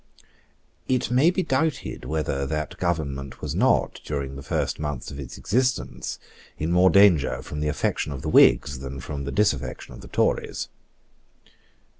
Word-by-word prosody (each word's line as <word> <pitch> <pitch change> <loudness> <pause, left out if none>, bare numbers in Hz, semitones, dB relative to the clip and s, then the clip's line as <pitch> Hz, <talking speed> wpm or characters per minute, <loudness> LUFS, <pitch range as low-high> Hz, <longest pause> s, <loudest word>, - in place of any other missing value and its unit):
It 125 -2 0
may 130 +7 +5
be 185 +1 0
doubted 145 0 -1
whether 70 -3 -1
that 75 +1 -3
government 70 -6 -2
was - - -4
not, - - +2
during 70 -2 -4
the 70 - -7
first - - -2
months 75 -4 -4
of 70 - -8
its 65 -3 -7
existence, 120 - -1 0.4
in 80 +3 -2
more 90 +1 +5
danger 95 -8 +4
from 75 - -6
the 75 - -1
affection 75 0 -1
of 65 -2 -6
the - - -2
Whigs 65 +2 +5
than 65 0 -6
from 70 +1 -5
the 70 - -3
disaffection 70 - -1
of - - -11
the - - -11
Tories. - - 0
75 Hz, 160 wpm, -25 LUFS, 70-95 Hz, 0.4 s, may